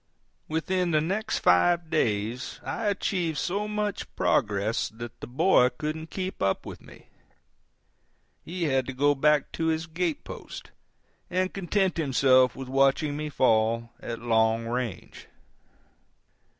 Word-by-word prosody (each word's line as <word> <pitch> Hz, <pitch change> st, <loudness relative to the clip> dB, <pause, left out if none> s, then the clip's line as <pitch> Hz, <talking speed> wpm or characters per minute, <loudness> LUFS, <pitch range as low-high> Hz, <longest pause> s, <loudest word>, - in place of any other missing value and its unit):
Within 180 Hz, +3 st, 0 dB
the 155 Hz, -2 st, +3 dB
next 195 Hz, +8 st, -1 dB
five 170 Hz, -, +3 dB
days 115 Hz, -1 st, -1 dB
I 225 Hz, -, -3 dB
achieved 180 Hz, -5 st, -1 dB
so 200 Hz, +8 st, -1 dB
much 210 Hz, -1 st, -3 dB
progress 105 Hz, +2 st, +1 dB
that 115 Hz, +1 st, -9 dB
the -, -, -6 dB
boy 130 Hz, 0 st, +4 dB
couldn't 155 Hz, +4 st, -5 dB
keep 185 Hz, +1 st, -5 dB
up 95 Hz, 0 st, 0 dB
with -, -, -9 dB
me. -, -, -16 dB, 1.3 s
He 175 Hz, +1 st, -4 dB
had 135 Hz, -4 st, +1 dB
to 135 Hz, -, -4 dB
go 145 Hz, +3 st, +3 dB
back 150 Hz, +1 st, +2 dB
to 165 Hz, -, -2 dB
his 160 Hz, 0 st, 0 dB
gate 170 Hz, -1 st, -2 dB
post, -, -, -9 dB, 0.6 s
and 185 Hz, +1 st, 0 dB
content 190 Hz, 0 st, 0 dB
himself 130 Hz, -4 st, +4 dB
with 135 Hz, -1 st, -7 dB
watching 135 Hz, +2 st, +2 dB
me 150 Hz, 0 st, -4 dB
fall 115 Hz, -3 st, +2 dB
at 115 Hz, -, -5 dB
long 115 Hz, -1 st, +1 dB
range. 115 Hz, -6 st, -5 dB
150 Hz, 135 wpm, -27 LUFS, 120-175 Hz, 1.3 s, boy